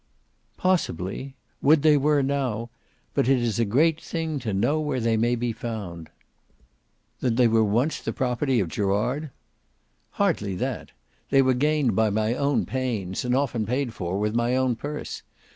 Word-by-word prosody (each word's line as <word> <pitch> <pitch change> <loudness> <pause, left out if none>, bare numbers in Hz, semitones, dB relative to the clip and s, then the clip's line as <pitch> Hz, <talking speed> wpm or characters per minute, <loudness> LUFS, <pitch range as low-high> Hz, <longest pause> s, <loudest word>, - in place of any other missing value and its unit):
"Possibly. 135 - -1 0.3
Would 150 +1 +4
they 155 -1 +6
were 145 0 +3
now! 125 -5 -2 0.4
But 125 - +1
it 135 - +5
is 115 -3 -1
a 115 - +3
great 150 +9 +2
thing 160 -3 -3
to 115 -4 -3
know 120 +11 +1
where 145 -4 -1
they 115 -1 +1
may 120 +2 +2
be 120 -1 -2
found." 100 -8 -6 1.1
"Then 120 -3 0
they 125 0 +5
once 115 +6 +2
were - - -18
the - - 0
property 130 0 0
of 95 - 0
Gerard?" 105 - -1 0.8
"Hardly 135 - 0
that. - - -3 0.4
They 135 -1 +5
were 130 0 +3
gained 145 -3 +1
by 110 +1 +3
my 110 +2 0
own 140 +2 +1
pains, 115 -8 -2
and 125 0 +1
often 120 -6 0
paid 125 0 -1
for 90 -1 -3
with 105 +1 0
my 120 +2 +1
own 130 -2 +1
purse. 145 +5 -6
125 Hz, 165 wpm, -25 LUFS, 110-140 Hz, 1.1 s, they